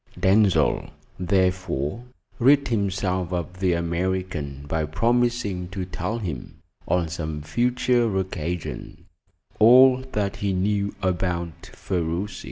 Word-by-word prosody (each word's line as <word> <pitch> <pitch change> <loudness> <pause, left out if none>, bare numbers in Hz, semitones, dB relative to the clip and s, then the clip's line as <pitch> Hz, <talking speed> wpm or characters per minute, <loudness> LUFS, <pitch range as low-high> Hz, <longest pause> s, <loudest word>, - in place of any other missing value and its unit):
Denzil, 95 -5 +3 0.3
therefore, 90 - 0 0.3
rid 140 +3 +4
himself 95 -4 -1
of 90 0 -4
the 95 -2 +2
American 85 -4 -2
by 80 +1 -1
promising 115 +2 0
to 95 0 -5
tell 90 +4 -3
him, 85 - -6 0.3
on 90 -2 +1
some 80 -2 -5
future 120 +3 +1
occasion, 90 -2 -4 0.5
all 130 +3 +7
that 100 -2 -1
he 100 -1 -1
knew 100 +2 0
about 85 -2 -2
Ferruci. 90 +2 -3
95 Hz, 105 wpm, -24 LUFS, 85-105 Hz, 0.5 s, all